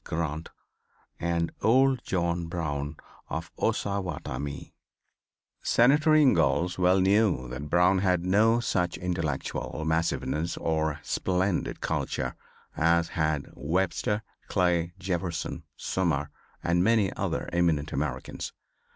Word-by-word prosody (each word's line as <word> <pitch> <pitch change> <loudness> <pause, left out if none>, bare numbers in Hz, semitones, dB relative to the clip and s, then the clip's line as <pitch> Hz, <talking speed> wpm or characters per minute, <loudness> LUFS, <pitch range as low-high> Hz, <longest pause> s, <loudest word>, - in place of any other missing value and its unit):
Grant 80 -1 -3 0.7
and 85 -1 0
old 130 +2 +4
John 85 -2 -1
Brown 75 -3 -3 0.3
of 80 0 -4
Ossowattamie." 90 -7 -3 0.9
Senator 150 +6 +4
Ingalls 110 - +3
well 90 +1 +4
knew 95 - +3
that 70 +4 -6
Brown 90 +2 +4
had 90 -2 +1
no 110 +5 +4
such 90 -7 0
intellectual 85 -3 -3
massiveness, 80 0 0
or 80 -2 0
splendid 95 0 -1
culture, - - -2 0.4
as 85 +1 +3
had 80 -3 0
Webster, 95 +7 -1 0.2
Clay, 90 -2 +1
Jefferson, 90 -2 -3
Sumner, 75 -6 -1 0.3
and 85 +1 +2
many 110 -2 +3
other - - -2
eminent 80 -4 +1
Americans. 75 +3 -3
85 Hz, 100 wpm, -28 LUFS, 80-95 Hz, 0.9 s, old